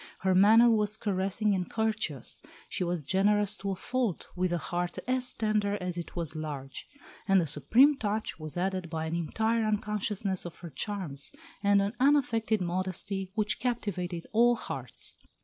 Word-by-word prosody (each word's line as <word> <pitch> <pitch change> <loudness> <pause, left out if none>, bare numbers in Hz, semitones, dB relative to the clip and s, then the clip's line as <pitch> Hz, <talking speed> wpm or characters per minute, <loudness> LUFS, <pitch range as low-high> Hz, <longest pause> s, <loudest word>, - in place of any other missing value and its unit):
Her 190 -1 +2
manner 215 +5 +7
was 215 -2 +2
caressing 200 0 0
and 185 -2 -2
courteous; 215 - -2 0.3
she - - -2
was 175 -3 -2
generous 205 +5 +2
to 200 - -4
a 195 - -1
fault, 240 -1 -2
with 180 0 0
a 175 - +1
heart 175 +1 -3
as 255 0 +2
tender 210 -2 0
as 180 -1 -3
it 170 -1 -6
was 170 -2 -2
large. 145 -4 -6 0.4
And 195 -1 +5
the 170 - +1
supreme 245 - +5
touch 215 -6 -2
was 155 +1 -7
added 185 -1 -1
by 160 -1 -3
an 160 +1 -2
entire 220 +7 0
unconsciousness 210 -2 -1
of 175 - -8
her 165 - -7
charms, 150 -2 -4 0.3
and 200 -1 +4
an 200 +2 -2
unaffected 235 -6 +3
modesty 185 +2 -2
which 210 -1 0
captivated 190 -8 -2
all 240 +2 +5
hearts. - - -6
195 Hz, 165 wpm, -29 LUFS, 175-220 Hz, 0.4 s, manner